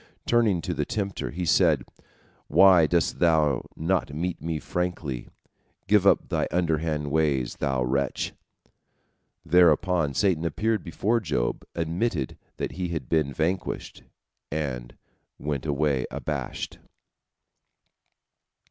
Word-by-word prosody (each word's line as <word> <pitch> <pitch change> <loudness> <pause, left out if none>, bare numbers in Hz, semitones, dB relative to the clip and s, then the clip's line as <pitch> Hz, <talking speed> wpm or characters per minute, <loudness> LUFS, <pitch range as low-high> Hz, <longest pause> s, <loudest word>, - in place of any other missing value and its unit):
Turning 110 -7 +3
to - - -2
the - - -1
tempter, 100 -3 -3
he 90 +2 -4
said: 80 -6 +4 0.6
"Why 90 -5 +6
dost 85 +1 +1
thou 80 -6 +3
not 85 -1 0
meet 85 +4 -3
me 80 -1 -2
frankly? 80 -5 -3 0.6
Give - - +4
up - - +4
thy - - 0
underhand 80 -4 0
ways, 70 -5 +1
thou 65 -3 0
wretch." 65 +1 -1 1.1
Thereupon 85 -2 +3
Satan 90 -6 +2
appeared 105 +5 0
before 110 +7 0
Job, 75 - -1
admitted 85 - -1 0.2
that - - -3
he 90 -1 -3
had 85 -2 -4
been 80 -4 +2
vanquished, 80 +7 -2 0.5
and 65 -5 -4 0.4
went 75 0 -3
away 70 -3 +1
abashed. - - -4
80 Hz, 110 wpm, -26 LUFS, 70-90 Hz, 1.1 s, Why